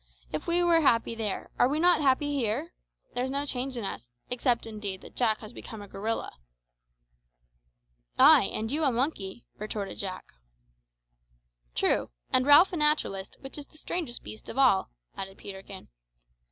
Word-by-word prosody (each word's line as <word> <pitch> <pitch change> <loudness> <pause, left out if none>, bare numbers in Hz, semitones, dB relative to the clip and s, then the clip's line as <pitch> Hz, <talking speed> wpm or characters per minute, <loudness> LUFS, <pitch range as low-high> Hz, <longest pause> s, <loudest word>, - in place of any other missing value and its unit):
If 155 - -4
we 345 +1 +3
were 335 -1 +4
happy 230 -5 +3
there, 220 -3 -4
are 245 - +5
we 295 +3 0
not 350 -1 +4
happy 290 +1 +2
here? 275 +6 -1 0.4
There's 250 +1 -1
no 280 +2 -1
change 260 -1 -3
in 230 - -3
us 120 -10 -6 0.2
except, 245 -1 +1
indeed, 210 -4 -5
that - - -14
Jack 220 -3 +1
has 215 +1 -10
become 220 -2 -9
a 205 - -9
gorilla." 210 +4 -3 1.9
"Ay, - - +8
and 220 +2 -3
you 310 +3 0
a 275 - +3
monkey," 240 -5 -2
retorted 210 -1 -5
Jack. 185 -2 -4 1.5
"True; - - +1 0.2
and 255 +1 +4
Ralph 315 +6 +8
a - - -1
naturalist, 300 -11 +1
which 270 +2 -8
is 285 - -10
the - - -20
strangest 310 -6 -4
beast 215 - -10
of - - -7
all," 255 -8 +4 0.3
added 195 0 -7
Peterkin. 195 -1 -9
245 Hz, 160 wpm, -28 LUFS, 210-290 Hz, 1.9 s, Ay